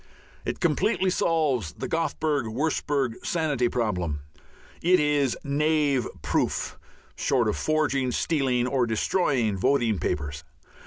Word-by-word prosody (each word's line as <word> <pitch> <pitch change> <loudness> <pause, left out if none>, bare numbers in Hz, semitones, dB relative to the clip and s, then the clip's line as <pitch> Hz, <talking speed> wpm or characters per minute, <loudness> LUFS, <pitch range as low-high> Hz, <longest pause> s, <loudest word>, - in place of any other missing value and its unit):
It - - -3
completely 190 -4 +1
solves 145 - +1
the 130 - -5
Goldbug 155 -3 0
Wurstberg 135 0 -1
Sanity 155 - 0
problem. 90 - -1 0.6
It 180 +2 +4
is 145 -3 +2
knave 145 -2 +1 0.2
proof - - -1 0.4
short 125 -5 +1
of 105 - 0
forging, 140 -4 +1
stealing, 130 -5 +1
or 125 -1 +1
destroying 115 - +1
voting 115 -4 +2
papers. 75 -1 -3
135 Hz, 110 wpm, -26 LUFS, 115-155 Hz, 0.6 s, It